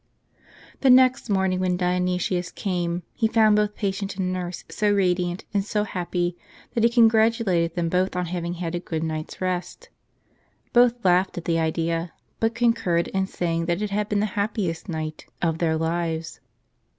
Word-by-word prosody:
?HE 270 - +4
next 255 -1 +5
morning, 190 -2 +1
when 180 -1 +1
Dionysius 180 0 0
came, 175 -2 -2
he 225 - +1
found 220 -1 +4
both 210 0 +1
patient 195 -1 -3
and 185 -1 -1
nurse 180 -1 -4
so 210 -1 0
radiant 180 -2 0
and 200 -1 +1
so 210 0 -1
happy, 175 -2 -2 0.4
that 230 - +1
he 235 - +6
congratulated 225 -7 +3
them 170 -1 0
both 180 +2 0
on 180 0 -1
having 175 0 -3
had 170 -1 -4
a 175 - -1
good 160 -2 -4
night's 155 -1 -4
rest. 185 - -3 0.8
Both 240 -2 +4
laughed 180 +1 +3
at 175 - -5
the 165 -1 +1
idea; 165 +1 -1 0.3
but 225 0 +1
concurred 230 -8 +1
in 190 0 -1
saying 165 -3 -2
that 175 +4 0
it 210 - -3
had 210 +1 -1
been 205 -1 +1
the - - +2
happiest 200 -4 -2
night 155 -2 -5
of 165 -1 0
their 160 -2 +1
lives. 165 0 -2
180 Hz, 170 wpm, -24 LUFS, 170-210 Hz, 0.8 s, he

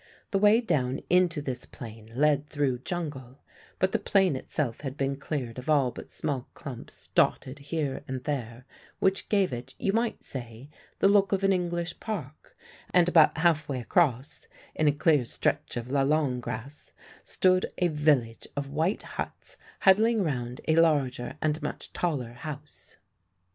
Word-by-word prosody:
The 195 - +2
way 210 +3 +6
down 130 - 0
into 180 -4 +3
this 125 -3 -5
plain 110 -2 -10
led 150 +1 +2
through 140 -4 0
jungle; 135 -5 -5 0.4
but 185 - +1
the - - +1
plain 190 -6 +3
itself 130 -2 -3
had 135 -1 -5
been 140 0 0
cleared 135 -4 -4
of 125 - -7
all 140 -5 +4
but - - -10
small 135 -5 -3
clumps 140 -7 -9
dotted 135 +3 +1
here 145 -1 -3
and 130 -1 -4
there, 125 -5 -4 0.3
which 190 0 0
gave 195 -8 +2
it, 120 0 -7
you 195 - 0
might 230 +1 0
say, 120 +1 -8 0.3
the - - +4
look 200 0 +4
of 195 0 0
an 195 0 +4
English 175 -1 -2
park; 155 - -6 0.3
and 175 -1 +5
about 165 -3 +5
half 160 -3 +2
way 135 -2 -1
across, 135 0 0 0.3
in 155 - +1
a - - +6
clear 145 -1 +3
stretch 120 - -2
of 120 +2 -5
lalang 140 -1 +2
grass, 125 +4 -7 0.3
stood 185 0 +2
a 180 - +3
village 145 -8 +1
of 140 -1 -3
white 160 +7 0
huts - - -6 0.3
huddling 215 +3 +5
round 125 -6 -3
a 160 0 +3
larger 140 -5 +2
and 155 +1 +1
much - - -5
taller 135 -9 -2
house. 150 +3 -8
145 Hz, 160 wpm, -28 LUFS, 130-175 Hz, 0.4 s, way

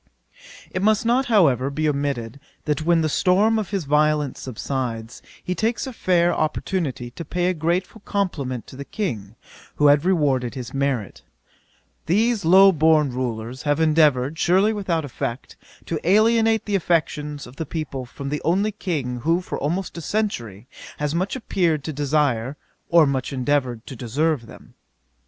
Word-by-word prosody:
It 185 - -2
must 215 +2 +2
not, 250 +3 +2
however, 140 - +3
be 155 +2 -1
omitted, 140 -4 -2 0.3
that 150 0 0
when 170 0 +3
the 160 - +1
storm 200 +8 +3
of 210 - -4
his 195 -6 -2
violence 150 -1 +1
subsides, 125 -2 -4 0.2
he 180 - -2
takes 220 +5 -1
a 260 - -6
fair 175 -5 +2
opportunity 155 -6 -2
to 170 - -7
pay 175 +3 -2
a - - +1
grateful 175 +6 -2
compliment 140 - -2
to - - -13
the 140 - -6
King, 115 - -4 0.4
who 150 - +1
had 145 +1 +4
rewarded 145 -9 +1
his 125 -3 -7
merit: 135 -6 -2 0.9
'These 220 +5 +2
low 190 +4 +7
born 155 -3 +3
rulers 120 0 -4
have 145 0 0
endeavoured, 155 -2 +3
surely 190 +5 +3
without 175 -7 -1
effect, 125 -1 -5 0.3
to 165 - -3
alienate 220 +4 +3
the 205 - -3
affections 150 -5 0
of 125 +2 -14
the 160 - -3
people 140 -5 -4
from 140 +2 -7
the 150 +1 -3
only 195 +6 +1
King 150 - -3
who 165 +8 +1
for 180 - -5
almost 175 +6 -2
a - - -7
century 120 - -3 0.3
has 150 0 -2
much 185 +6 -1
appeared 170 - 0
to 155 - -4
desire, 140 -3 0 0.3
or 170 -2 +6
much 135 -2 -1
endeavoured 130 -3 -1
to 135 - -8
deserve 130 +2 -1
them.' - - -15
155 Hz, 160 wpm, -22 LUFS, 135-185 Hz, 0.9 s, low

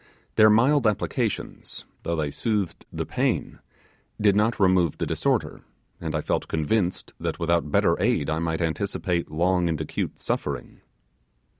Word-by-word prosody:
Their 110 -1 +7
mild 125 +4 +4
applications, 105 - -2 0.2
though 85 - -2
they 75 -3 -1
soothed 105 -4 -2
the - - -3
pain, - - -1 0.6
did 105 -2 +4
not 110 +3 +2
remove 90 -5 +3
the - - -1
disorder, - - -1 0.4
and 80 -1 -3
I 75 - 0
felt - - -1
convinced 90 +4 -1
that - - -2
without 85 -2 +1
better - - +3
aid 70 - +2
I 80 0 0
might 80 0 -1
anticipate 85 0 -1
long 90 +2 +1
and 80 -2 -1
acute 80 - -3
suffering. 70 -4 -3
85 Hz, 145 wpm, -25 LUFS, 80-105 Hz, 0.6 s, Their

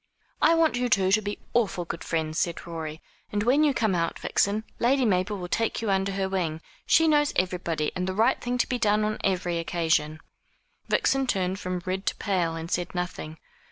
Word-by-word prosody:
"I 330 +2 +5
want 320 -6 +3
you 245 0 0
two 190 -3 +3
to 215 +2 +4
be 205 0 -4 0.2
awful 200 -7 +1
good 170 - -6
friends," 160 -1 -1
said 170 -1 -2
Rorie; 160 -2 -6 0.3
"and 205 0 0
when 265 +6 +4
you 300 - +4
come 220 -6 +1
out, 165 -1 -1
Vixen, 205 +2 0 0.2
Lady 260 +2 +3
Mabel 200 0 +1
will 180 -2 -5
take 225 +5 0
you 220 -2 -1
under 195 0 +1
her 190 0 -1
wing. 175 -5 -2 0.3
She 325 0 +5
knows 295 -1 +3
everybody, 175 -4 -1
and 180 0 -2
the 190 - -2
right 230 +5 +2
thing 245 0 -1
to 245 - +1
be 250 - -2
done 210 -1 +2
on 215 0 -2
every 180 -3 0
occasion." 160 -2 0 0.7
Vixen 270 -1 +2
turned 190 -3 0
from 180 -2 -4
red 190 +1 -3
to - - +1
pale, 175 -5 -1
and 165 +1 -6
said 175 +1 -2
nothing. 180 -3 -4
190 Hz, 205 wpm, -26 LUFS, 175-225 Hz, 0.7 s, I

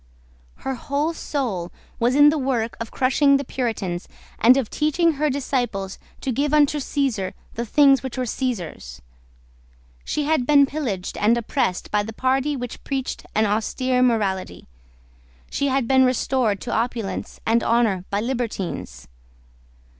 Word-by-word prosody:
Her 265 - 0
whole 285 +6 -1
soul 225 - -3 0.3
was 240 +2 +2
in 290 +1 +8
the 310 - +1
work 245 -4 -1
of 230 -1 -5
crushing 275 +2 +3
the 275 - -3
Puritans, 205 -10 -3 0.3
and 245 +4 +6
of 265 -5 0
teaching 315 +3 +2
her 300 0 0
disciples 245 -8 -2 0.2
to 265 - -1
give 285 +5 +1
unto 295 0 +3
Caesar 260 -10 -1 0.2
the 235 +1 -4
things 275 +1 +5
which 260 -1 -6
were 255 - 0
Caesar's. 185 - -4 1.0
She 300 - -2
had 290 -4 +1
been 285 -2 +6
pillaged 255 -11 -4
and 225 +3 +3
oppressed 230 -5 -1
by 210 - +2
the 220 +2 -6
party 265 +4 +1
which 245 -2 -6
preached 270 -2 -4
an 215 +1 +3
austere 250 +5 0
morality. 210 -7 0 0.9
She 280 - 0
had 265 -3 +1
been 265 0 +5
restored 255 -4 +1
to 240 - -4
opulence 230 -2 -3
and 230 +1 +2
honour 225 -6 +2
by 200 +1 0
libertines. 210 - -4
250 Hz, 145 wpm, -23 LUFS, 220-275 Hz, 1.0 s, in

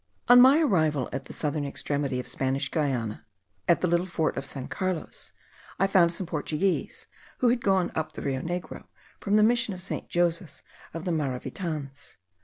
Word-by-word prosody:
On 245 0 +9
my 265 +4 +7
arrival 155 - +2
at 135 0 -4
the - - -10
southern 150 -1 -2
extremity 140 -1 -2
of 125 - -6
Spanish 135 +1 -1
Guiana, 130 -9 -1 0.4
at 170 - +4
the 180 - +2
little 175 +2 +1
fort 160 -3 -1
of 135 - -4
San 135 -2 -6
Carlos, 185 -3 -4 0.5
I 195 - +3
found 185 -3 +4
some 180 +2 -3
Portuguese, 165 +3 -2 0.3
who 245 - +3
had 240 0 +1
gone 190 -3 +2
up 160 - -3
the - - -7
Rio 135 -2 -1
Negro 175 +1 -5 0.3
from 205 0 0
the 215 - +6
Mission 230 -3 +2
of 180 - -10
St. - - -5
Joseph 170 -5 -1 0.3
of 165 +2 -5
the 180 - 0
Maravitans. 145 0 -4
165 Hz, 180 wpm, -27 LUFS, 140-190 Hz, 0.5 s, On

